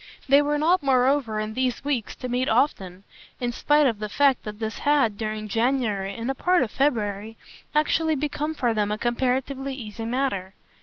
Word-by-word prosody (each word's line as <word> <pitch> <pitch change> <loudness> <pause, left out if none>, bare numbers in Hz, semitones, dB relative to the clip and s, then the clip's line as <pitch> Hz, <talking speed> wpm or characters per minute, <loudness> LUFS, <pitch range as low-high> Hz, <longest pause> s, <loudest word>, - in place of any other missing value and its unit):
They 280 +2 +6
were 295 0 0
not 335 +5 +3
moreover 260 -4 +2
in 215 0 -3
these 255 0 -1
weeks 265 -7 -2
to 255 - -6
meet 250 +2 0
often, 190 -9 0 0.4
in 245 -1 -1
spite 295 +4 +3
of 230 -6 +1
the 210 0 -4
fact 275 +3 +2
that 210 -1 -6
this 220 0 -4
had, 285 -8 +2
during 215 0 -4
January 225 -4 0
and 235 +3 -2
a - - -2
part 360 +3 +2
of 225 - -4
February, 220 -5 -1 0.4
actually 315 +1 +2
become 300 +2 -2
for 245 -5 0
them 210 -1 0
a 210 - -1
comparatively 260 +3 -1
easy 225 -3 -7
matter. 230 -7 -2
250 Hz, 185 wpm, -24 LUFS, 215-280 Hz, 0.4 s, They